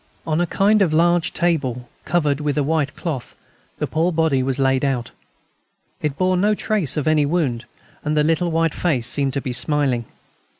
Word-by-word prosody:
On 160 +1 0
a 175 - 0
kind 205 +5 +2
of 165 -5 +2
large 170 +1 +2
table, 135 -9 -1 0.2
covered 150 -4 +1
with 150 0 -1
a 145 - +2
white 150 -1 -1
cloth, 155 -8 -5 0.4
the - - -1
poor 165 +3 0
body 160 -5 +1
was 130 0 -1
laid 135 -1 +1
out. 125 -4 -1 0.9
It 150 -2 -2
bore 185 0 +1
no 210 +3 +2
trace 200 - 0
of 150 - -1
any 155 -1 +3
wound, 145 -6 -1 0.4
and 150 0 -1
the 150 - +4
little 165 +3 +1
white 165 -1 +1
face 140 -10 0
seemed 135 +2 0
to 140 - -1
be 130 - -4
smiling. 125 -1 +1
150 Hz, 185 wpm, -21 LUFS, 135-170 Hz, 0.9 s, the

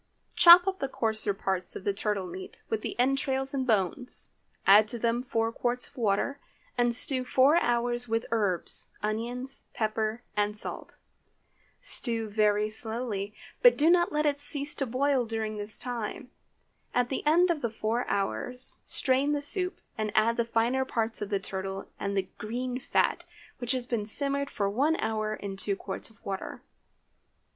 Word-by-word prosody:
Chop 350 +1 +10
up 385 -1 -2
the 275 - -1
coarser 220 -4 -1
parts 190 -2 -3
of - - -7
the 200 - 0
turtle 200 -1 -1
meat, 180 +1 -8
with 220 -1 -1
the - - -5
entrails 270 +1 +1
and 265 -2 -1
bones. 220 +4 0 0.4
Add 205 +2 +7
to 240 - -3
them 235 +1 0
four 225 -3 -1
quarts 245 +1 0
of - - -24
water, 235 +5 0 0.4
and 240 -1 +2
stew 255 +1 +2
four 265 +5 +4
hours 240 -3 0
with 225 +1 0
the - - -13
herbs, 205 -6 0 0.2
onions, 240 +5 -3
pepper, 220 +1 -1
and 210 0 +1
salt. - - -3 0.8
Stew 230 -3 +1
very 210 0 +2
slowly, 220 -2 -3 0.3
but - - +7
do 315 +3 +5
not 345 -1 +3
let 300 0 0
it 285 -1 +1
cease 285 0 -1
to 275 - -2
boil 260 +2 +1
during 220 -2 -3
this 205 0 -5
time. 245 +1 -5 0.6
At 245 0 +2
the 265 - -3
end 345 +3 +5
of 240 -9 -2
four 225 +3 -1
hours 250 +5 -3
strain 275 +2 +1
the 290 - 0
soup, 365 +5 +1 0.2
and 215 -1 -1
add 225 +2 +4
the 235 - +1
finer 235 +3 +1
parts 230 -4 -2
of 205 - -3
the 200 -2 0
turtle 190 0 -5
and 200 0 -2
the 190 -1 0
green 250 +3 -3
fat, - - 0 0.3
which 245 +1 -1
has 255 -2 0
been 230 -4 -2
simmered 280 +4 0
for 200 -3 -1
one 275 +11 +2
hour 215 -4 -1
in 195 -2 -6
two 200 +1 -1
quarts 195 +2 -5
of 220 - -25
water. 195 -1 -5
230 Hz, 170 wpm, -28 LUFS, 210-265 Hz, 0.8 s, Chop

